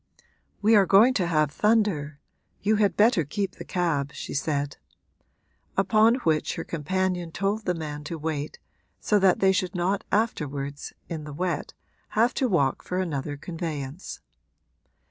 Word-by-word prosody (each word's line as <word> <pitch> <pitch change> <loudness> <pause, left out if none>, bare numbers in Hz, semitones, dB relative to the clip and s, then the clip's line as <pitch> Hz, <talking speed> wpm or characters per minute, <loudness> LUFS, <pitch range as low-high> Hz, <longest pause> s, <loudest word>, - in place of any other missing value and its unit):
'We 220 +2 +6
are 200 - +5
going 220 +6 +6
to 185 -8 0
have 155 -3 +2
thunder; 195 -9 +1 0.4
you 215 +2 +3
had 205 -2 +2
better 210 -5 +4
keep 195 +7 -2
the - - -7
cab,' 155 -6 -1
she - - -6
said; 145 0 -1 1.0
upon 215 +4 +4
which 155 -2 +1
her - - -4
companion 180 +2 -2
told 200 +5 -1
the 180 - 0
man 150 -2 -5
to 165 +2 -4
wait, 155 -1 -4 0.4
so 210 - +2
that 190 -2 +3
they 190 0 +5
should 185 -1 -1
not 185 +3 0
afterwards, 145 -10 -2 0.2
in 160 -2 -5
the 150 -1 -8
wet, 170 0 -3 0.4
have 235 +3 +4
to 260 - 0
walk 140 -9 +1
for 180 - -4
another 145 -5 -2
conveyance. 155 -1 -6
175 Hz, 150 wpm, -26 LUFS, 150-200 Hz, 1.0 s, We